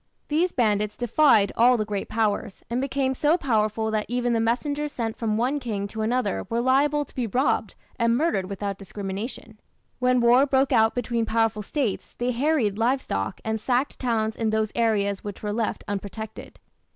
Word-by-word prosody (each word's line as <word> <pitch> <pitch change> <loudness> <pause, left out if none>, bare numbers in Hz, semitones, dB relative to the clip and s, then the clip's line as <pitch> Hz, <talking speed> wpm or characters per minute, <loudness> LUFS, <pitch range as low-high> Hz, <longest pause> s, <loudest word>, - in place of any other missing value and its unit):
These 335 +4 +2
bandits 210 -3 0
defied 235 -3 +4
all 245 +2 +5
the 215 - -1
great 205 -2 -4
powers, 215 -3 -1
and 245 +2 0
became 270 -1 0
so 300 +5 +2
powerful 220 - 0
that 215 -1 -1
even 245 0 0
the 230 - +2
messengers 285 +6 -1
sent 225 -4 -3
from 215 -2 -1
one 260 +5 0
king 210 -6 -3
to 220 - -5
another 220 - -1
were 230 - 0
liable 280 +4 +2
to - - -21
be 245 -3 -2
robbed 255 +7 0 0.2
and 230 0 +3
murdered 270 - 0
without 200 0 -4
discrimination. 205 +3 -6 0.4
When 250 0 +3
war 245 +4 +5
broke 270 0 +2
out 225 -2 +4
between 235 -2 -1
powerful 225 -1 +1
States 230 -1 -3
they 245 +1 0
harried 245 -5 +1
live 250 +4 +2
stock 95 - -4
and 220 -1 -2
sacked 255 +4 0
towns 220 -3 0
in 225 -1 -1
those 215 -1 0
areas 205 -4 +1
which 205 0 -7
were 210 0 -2
left 225 0 -2
unprotected. 205 +2 -6
230 Hz, 180 wpm, -25 LUFS, 210-255 Hz, 0.4 s, all